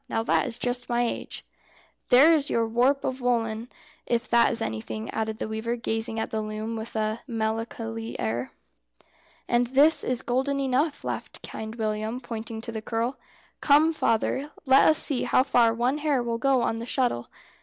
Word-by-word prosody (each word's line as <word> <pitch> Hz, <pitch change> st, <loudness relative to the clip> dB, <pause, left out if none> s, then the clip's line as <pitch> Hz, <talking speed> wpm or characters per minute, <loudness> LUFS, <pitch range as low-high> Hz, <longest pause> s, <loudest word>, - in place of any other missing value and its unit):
Now 225 Hz, -, 0 dB
that 230 Hz, -, +2 dB
is 235 Hz, -2 st, -5 dB
just 245 Hz, 0 st, -3 dB
my 240 Hz, 0 st, +2 dB
age." -, -, -6 dB, 0.6 s
"There 275 Hz, +6 st, +7 dB
is 295 Hz, -3 st, +1 dB
your 230 Hz, -1 st, +1 dB
warp 250 Hz, +5 st, +2 dB
of 260 Hz, 0 st, -3 dB
woollen, 230 Hz, -1 st, 0 dB, 0.4 s
if 235 Hz, 0 st, 0 dB
that 235 Hz, -1 st, +5 dB
is 230 Hz, -, -1 dB
anything," 110 Hz, -, -4 dB
added 220 Hz, 0 st, -2 dB
the -, -, -3 dB
weaver, 220 Hz, +2 st, -2 dB
gazing 225 Hz, -1 st, -2 dB
at -, -, -3 dB
the 220 Hz, -, -1 dB
loom 215 Hz, +1 st, -4 dB
with 220 Hz, +1 st, -6 dB
a 215 Hz, +1 st, -1 dB
melancholy 225 Hz, 0 st, -3 dB
air. 115 Hz, +3 st, -2 dB, 1.0 s
"And 240 Hz, 0 st, +2 dB
this 285 Hz, +6 st, +4 dB
is 255 Hz, 0 st, -2 dB
golden 270 Hz, +2 st, 0 dB
enough," 275 Hz, +3 st, 0 dB
laughed -, -, -5 dB
Kind 220 Hz, +1 st, -6 dB
William, 215 Hz, +1 st, -2 dB
pointing 230 Hz, -2 st, -6 dB
to 230 Hz, -, -6 dB
the 220 Hz, -1 st, -5 dB
curl. 230 Hz, +4 st, -2 dB, 0.4 s
"Come, 305 Hz, +3 st, +4 dB
father, 265 Hz, +2 st, 0 dB, 0.2 s
let 265 Hz, 0 st, +6 dB
us 310 Hz, -, +5 dB
see 280 Hz, -5 st, +1 dB
how 255 Hz, -, +3 dB
far 240 Hz, -4 st, +4 dB
one 245 Hz, +5 st, 0 dB
hair 290 Hz, -5 st, +1 dB
will 230 Hz, -1 st, -2 dB
go 265 Hz, -1 st, +3 dB
on 225 Hz, -, 0 dB
the 230 Hz, +1 st, -6 dB
shuttle." 245 Hz, -, 0 dB
235 Hz, 180 wpm, -26 LUFS, 220-260 Hz, 1.0 s, There